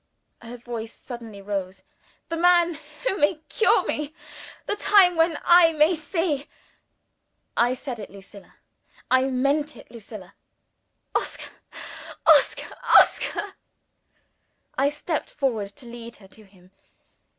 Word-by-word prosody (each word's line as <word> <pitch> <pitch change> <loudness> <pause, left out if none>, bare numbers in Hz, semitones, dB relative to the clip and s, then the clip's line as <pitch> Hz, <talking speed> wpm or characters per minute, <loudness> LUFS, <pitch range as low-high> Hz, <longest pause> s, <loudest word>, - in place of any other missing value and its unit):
Her 235 +1 -9
voice 230 -2 -7
suddenly 230 -5 -10
rose. 195 -2 -4 0.5
"The 330 - -2
man 345 -1 +3 0.3
who 400 -5 0
may 295 +4 +3
cure 445 - +3
me! 300 +1 -3 0.5
the 415 - -1
time 390 -4 +5
when 325 -1 +2
I 345 -1 +6
may 310 +3 +3
see!" 310 -2 -2 1.1
"I 245 +2 +2
said 250 -2 -7
it, 210 - -8
Lucilla. 195 +1 -15 0.6
I 260 0 +4
meant 280 +3 0
it, - - -15
Lucilla." 210 -4 -11 0.8
"Oscar! - - -3 0.7
Oscar!! - - +4 0.2
Oscar!!!" 410 -2 0 1.2
I 275 +2 +2
stepped 300 +2 -4
forward 235 -8 -2
to 285 - -13
lead 235 0 -10
her 195 - -17
to 215 +2 -17
him. 185 -2 -23
265 Hz, 120 wpm, -24 LUFS, 225-325 Hz, 1.2 s, I